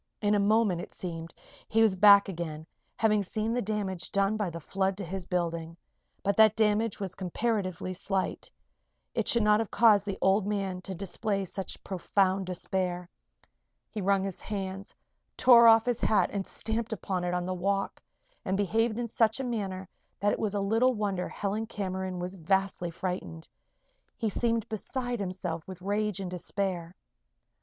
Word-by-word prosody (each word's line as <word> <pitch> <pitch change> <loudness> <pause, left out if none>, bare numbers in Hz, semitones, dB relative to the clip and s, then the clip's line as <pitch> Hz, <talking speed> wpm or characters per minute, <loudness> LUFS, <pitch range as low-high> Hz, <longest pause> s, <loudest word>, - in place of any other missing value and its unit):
In 205 0 +2
a 205 - +3
moment, 205 -3 +3
it - - -10
seemed, 165 -2 -6 0.4
he 225 0 +3
was 215 -4 +4
back 200 +1 +7
again, 160 -4 -5 0.3
having 215 -2 +3
seen 215 +3 -2
the 245 - 0
damage 195 -4 -3
done 200 +1 +2
by 210 -4 -1
the 170 0 -6
flood 190 +3 -1
to 200 - -4
his 185 +1 -5
building. 170 -2 -2 0.5
But 200 0 +1
that 220 -1 +6
damage 215 0 +1
was 190 -3 -4
comparatively 185 -1 -2
slight. 190 +1 -2 0.6
It - - -1
should 235 -2 +4
not 210 0 +5
have 225 - -2
caused 210 -3 +5
the 195 - -2
old 195 +1 +3
man 195 -3 -2
to 190 +1 -5
display 195 +2 -2
such 190 +1 -5
profound 190 0 0
despair. 180 0 -2 0.8
He 215 - -4
wrung 195 0 +2
his 195 -2 -5
hands, 195 -1 -5 0.4
tore 235 -2 +8
off 225 0 +7
his 245 -1 -1
hat 215 - +3
and 200 -2 -2
stamped 225 0 -2
upon 185 -3 -3
it 180 0 -1
on 180 0 -1
the 185 - -2
walk, 195 +2 -1 0.4
and 190 0 -1
behaved 220 +3 +1
in 240 -1 -2
such 225 +1 +2
a - - -2
manner 195 -6 -3 0.3
that 205 +1 +2
it - - -3
was 210 -2 -1
little 225 +6 +2
wonder 200 -4 -2
Helen 210 +2 -3
Cameron 190 -3 -3
was 180 +1 -4
vastly 190 0 0
frightened. 170 -2 -5 0.7
He 225 -3 0
seemed 230 +1 0
beside 245 +2 -3
himself 180 -4 -3
with 185 -2 -8
rage 205 +1 -1
and 185 -2 -4
despair. 180 -1 -3
195 Hz, 170 wpm, -29 LUFS, 185-215 Hz, 0.8 s, tore